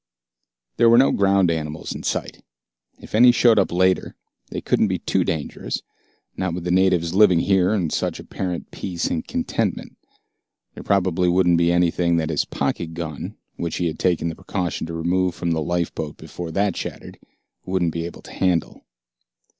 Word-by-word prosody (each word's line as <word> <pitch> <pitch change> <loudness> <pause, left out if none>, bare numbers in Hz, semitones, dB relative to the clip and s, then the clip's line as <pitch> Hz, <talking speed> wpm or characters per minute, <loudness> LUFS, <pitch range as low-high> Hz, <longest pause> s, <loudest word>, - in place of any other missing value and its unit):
There 115 - +5
were 115 - +6
no 135 +2 +5
ground 100 -3 +3
animals 75 -1 -4
in - - -7
sight. - - -3 0.6
If - - -13
any 120 +3 +7
showed 115 -2 +4
up 95 - +1
later, 95 +1 +1 0.3
they - - -4
couldn't - - +1
be - - -1
too - - 0
dangerous, 80 -3 -3 0.5
not 95 -3 -2
with 90 - -5
the 90 - -1
natives 90 -2 +2
living 95 -4 +5
here 95 -1 +3
in 85 -7 -1
such - - -2
apparent 90 -2 -5
peace 90 -3 -3
and 80 - -2
contentment. - - -2 0.7
There - - -9
probably 90 -2 +1
wouldn't 90 -1 +3
be 85 0 +3
anything 85 0 +2
that 80 -1 -1
his 75 - 0
pocket 80 -1 -3
gun, 80 -4 -6 0.2
which 85 -2 -3
he 90 - -1
had 80 -2 -3
taken 90 -2 +1
the 80 - -5
precaution 90 -3 -3
to 85 - -6
remove 90 +2 0
from 85 -1 -2
the 80 -1 0
lifeboat 80 -2 -2
before 85 -1 -7
that 100 +2 0
shattered, - - -7 0.4
wouldn't 90 -3 0
be 85 0 -3
able 85 - -11
to - - -12
handle. 90 -4 -1
90 Hz, 175 wpm, -22 LUFS, 85-95 Hz, 0.7 s, any